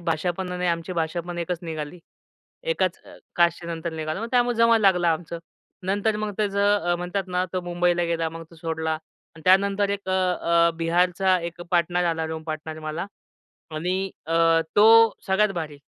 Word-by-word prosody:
भाषा 170 +1 -1
पण 185 -1 -4
आणि 180 0 -2
आमची 170 +1 -1
भाषा 165 0 -1
पण 175 +1 -7
एकच 170 0 -2
निघाली. 160 0 -6 0.6
एकाच - - 0
अ, - - -14 0.2
कास्टचे 170 -1 +2
नंतर 165 0 -4
निघालो. 155 +2 -4
मग 230 - -4
त्यामुळे 245 -2 +2
जमायला 230 -1 +4
लागला 180 -2 +2
आमचं. 170 +1 -5 0.5
नंतर 205 +3 +1
मग 215 0 -3
त्याचं 200 -3 +1
अ, - - +3
म्हणतात 180 +2 -3
ना 180 0 0
तो 185 - -1
मुंबईला 175 0 +1
गेला. 165 -1 -1
मग 165 +1 -8
तो - - -15
सोडला 160 0 -2
आणि 160 0 -15
त्यानंतर 200 +2 +3
एक 200 -1 -4
अ, - - +1
अ, 170 -2 +2
बिहारचा 180 +3 +2
एक 170 0 -6
पार्टनर 175 0 +2
आला, 165 -1 0
रूम 160 0 -5
पार्टनर 155 0 -5
मला 170 +5 -3 0.7
आणि 185 +4 -1 0.2
अ, 165 - -3 0.4
तो 210 +2 +7 0.4
सगळ्यात 200 +2 +3
भारी. 155 -4 -5
175 Hz, 175 wpm, -24 LUFS, 165-190 Hz, 0.7 s, तो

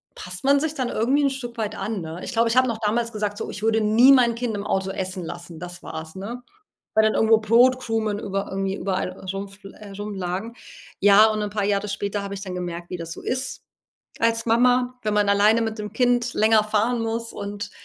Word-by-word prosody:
passt 180 +3 -8
man 280 0 +5
sich 315 0 -2
dann 255 -4 -1
irgendwie 270 +6 +1
'n 275 - +4
Stück 245 -3 -6
weit 220 -1 -3
an, 205 +1 -3
ne? 160 +2 -7
Ich - - -5
glaube, 230 0 +3
ich 230 - 0
hab 255 0 +5
noch 225 -2 -3
damals 230 +2 0
gesagt, 210 -2 -3
so: - - -5
„Ich 210 - -7
würde 225 0 +2
nie 235 +6 +6
mein 240 -3 +4
Kind 230 -3 -2
im 200 0 -4
Auto 195 -2 -1
essen 185 -2 -4
lassen.” 170 -1 -8
Das 175 0 -9
war's, 160 +2 -7
ne? 230 +6 -6 0.5
Weil 220 - +5
dann 215 - +2
irgendwo 220 0 +5
Brotkrumen 225 -1 +2
über 195 -1 -3
irgendwie 195 0 -2
überall 190 -2 -2 0.2
rumfl 195 0 -8
äh, 210 -2 -11
rumlagen. 200 +2 -5 0.4
Ja, 205 +2 +7
und 215 0 -2
'n 210 - -2
paar 205 -1 -1
Jahre 205 0 0
später 200 0 -3
hab 200 - -6
ich 195 - -6
dann 185 -2 -6
gemerkt, 175 -1 -5
wie 180 - -4
das 165 -1 -7
so - - -10
ist 255 +1 -4 0.6
als 230 0 +2
Mama, 250 +2 +3
wenn 215 -1 -1
man 205 -1 +2
alleine 210 +3 +4
mit 220 0 -3
dem 210 -1 -6
Kind 245 -1 +1
länger 215 0 +4
fahren 220 +3 +1
muss, 230 0 -3
und 205 0 -6
215 Hz, 220 wpm, -23 LUFS, 195-230 Hz, 0.6 s, Ja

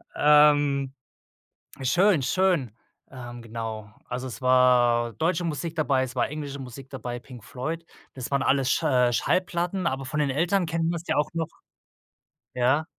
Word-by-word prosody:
Ähm, 145 -2 +4 0.9
schön, 175 +4 +3
schön, 170 - +1 0.3
ähm, 120 -2 -9
genau, 110 -2 -6 0.2
also, 125 +1 -4
es 125 - -8
war 125 -2 +4
deutsche 170 +2 0
Musik 165 +1 -3
dabei, 140 -4 +1
es 130 0 -6
war - - +1
englische 145 -2 -6
Musik 130 +1 -9
dabei, 125 -2 -5
Pink 125 -3 -13
Floyd. 160 +8 -5 0.3
Das 130 -2 -5
waren 140 -1 +1
alles 135 -1 +2
Sch - - 0
äh, 125 -1 +3
Schallplatten, 180 +4 0
aber 135 +1 -2
von 150 +4 -3
den 145 -2 +1
Eltern 175 +6 +1
kennt 165 0 -1
man's 170 -1 -3
ja - - +1
auch 150 - +1
noch 165 -2 -2 1.1
ja? 130 +5 +2
135 Hz, 155 wpm, -26 LUFS, 125-160 Hz, 1.1 s, Ähm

